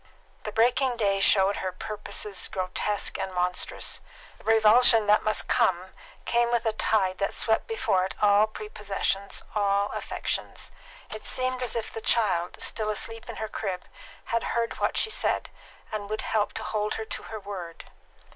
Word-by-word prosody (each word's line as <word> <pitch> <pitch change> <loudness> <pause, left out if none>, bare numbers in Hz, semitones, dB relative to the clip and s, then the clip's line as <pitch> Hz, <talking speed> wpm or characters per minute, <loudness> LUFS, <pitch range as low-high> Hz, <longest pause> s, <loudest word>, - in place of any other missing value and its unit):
The 215 - -3
breaking 245 +3 +2
day 200 -3 +2
showed 195 0 +5
her 185 - -2
purposes 210 +1 -3
grotesque 195 +1 -1
and 190 - -3
monstrous. 180 0 -1 0.4
The - - -19
revulsion 225 +1 +6
that 210 +1 +5
must 215 - -1
come, 185 +1 +2 0.3
came 235 0 +2
with 235 -1 +1
a 220 - +1
tide 190 -4 +1
that 200 - -1
swept 220 - +1
before 195 - +1
it 190 - -6
all 205 +1 +5
prepossessions, 205 -2 -3
all 200 -1 +1
affections. - - -3 0.4
It 215 - -5
seemed 255 0 0
as 250 -2 -1
if 230 -1 -3
the 225 - -6
child, 185 -8 +2
still 215 -1 0
asleep 225 +2 -3
in - - -5
her 220 - -4
crib, 195 -4 -4 0.4
had 230 0 0 0.2
heard 230 0 -1
what - - 0
she 440 - +2
said, - - 0 0.4
and 205 -2 -4
would 215 0 -2
help 215 -2 0
to - - -5
hold 210 -1 -1
her 220 - -4
to - - -5
her 220 - -5
word. 190 -5 -7
210 Hz, 165 wpm, -27 LUFS, 195-225 Hz, 0.4 s, revulsion